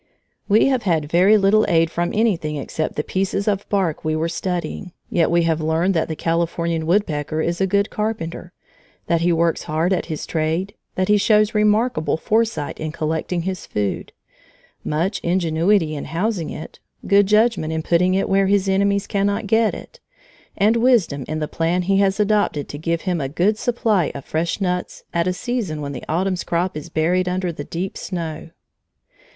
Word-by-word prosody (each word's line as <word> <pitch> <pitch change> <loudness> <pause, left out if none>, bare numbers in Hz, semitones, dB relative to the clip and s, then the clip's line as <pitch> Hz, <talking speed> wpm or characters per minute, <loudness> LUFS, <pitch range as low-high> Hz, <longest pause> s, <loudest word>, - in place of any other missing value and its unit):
We 210 +2 +5
have 265 -3 +2
had 160 -7 0
very 190 +5 +5
little 205 +2 +4
aid 165 -1 +3
from 175 +1 -1
anything 195 -9 0
except 155 +2 -3
the 150 - -1
piece 190 +3 -2
of 200 -1 -1
bark 190 -6 0
we 155 0 0
were 160 +1 -1
studying, 175 0 -4 0.2
yet 170 - +2
we 170 0 +3
have 165 -1 0
learned 160 +4 +1
that 160 - 0
the 160 - -4
Californian 165 0 -1
woodpecker 155 -5 0
is 170 +3 -1
a 190 - +3
good 200 +2 +1
carpenter; 180 -5 -4 0.5
that 170 -1 +1
he 175 +1 +2
works 165 0 +1
hard 160 +5 0
at 185 - -2
his 155 -3 -4
trade; 165 +5 -1 0.2
that 185 0 0
he 210 - +4
shows 215 +1 +3
remarkable 210 - +2
foresight 220 -4 -1
in 155 0 -3
collecting 160 +3 -2
his 185 0 -4
food, 105 -2 -3 0.7
much 165 +7 -1
ingenuity 170 0 +1
in 145 - -5
housing 175 +2 -2
it, 155 - -8 0.3
good 200 0 +4
judgment 215 -6 +2
in 160 0 -2
putting 180 +3 +2
it 195 - +1
where 195 0 +2
his 200 0 +2
enemies 200 +1 +2
cannot 205 +1 0
get 220 +2 +2
it, - - -12 0.6
and 215 +3 +3
wisdom 225 - +2
in 155 - -3
the 155 -1 -2
plan 170 +4 0
he 195 +2 +2
has 195 0 +2
adopted 205 -8 +1
to 145 - -7
give 165 +1 -1
him 180 -4 -1
a 135 - -2
good 180 +8 +1
supply 215 -7 0
of 140 - -7
fresh 165 +4 -2
nuts 180 -2 -2
at 170 +1 +1
a - - +2
season 190 -5 -3
when 140 -1 -4
the 125 - -7
autumn's 185 +3 0
crop 175 +1 -1
is 155 +2 -7
buried 180 +3 +1
under 180 -1 -1
the 150 -3 -7
deep 180 +5 -4
snow. 165 -4 -5
175 Hz, 185 wpm, -21 LUFS, 160-200 Hz, 0.7 s, We